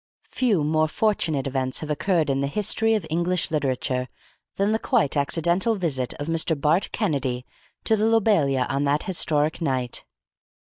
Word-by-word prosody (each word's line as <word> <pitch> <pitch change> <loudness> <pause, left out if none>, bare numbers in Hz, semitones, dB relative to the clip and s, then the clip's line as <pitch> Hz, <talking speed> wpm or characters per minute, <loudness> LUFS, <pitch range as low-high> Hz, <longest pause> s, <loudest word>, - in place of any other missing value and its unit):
Few 215 - +1
more 155 +1 +2
fortunate 160 -7 0
events 130 -1 -2
have 155 -1 -4
occurred 160 -1 +1
in 135 - 0
the 140 - 0
history 220 +6 +2
of 215 - -2
English 175 +1 0
literature 130 -3 -1 0.5
than 200 +2 +1
the 220 - +1
quite 225 - +1
accidental 170 +9 +1
visit 145 - -1
of 145 - -5
Mr. 165 -1 +1
Bart 155 +6 +2
Kennedy 135 - -2 0.4
to 220 - +3
the 215 0 0
Lobelia 195 - +2
on 140 +1 -1
that 145 +1 +1
historic 160 -5 0
night. 130 -5 -1
155 Hz, 155 wpm, -24 LUFS, 140-195 Hz, 0.5 s, to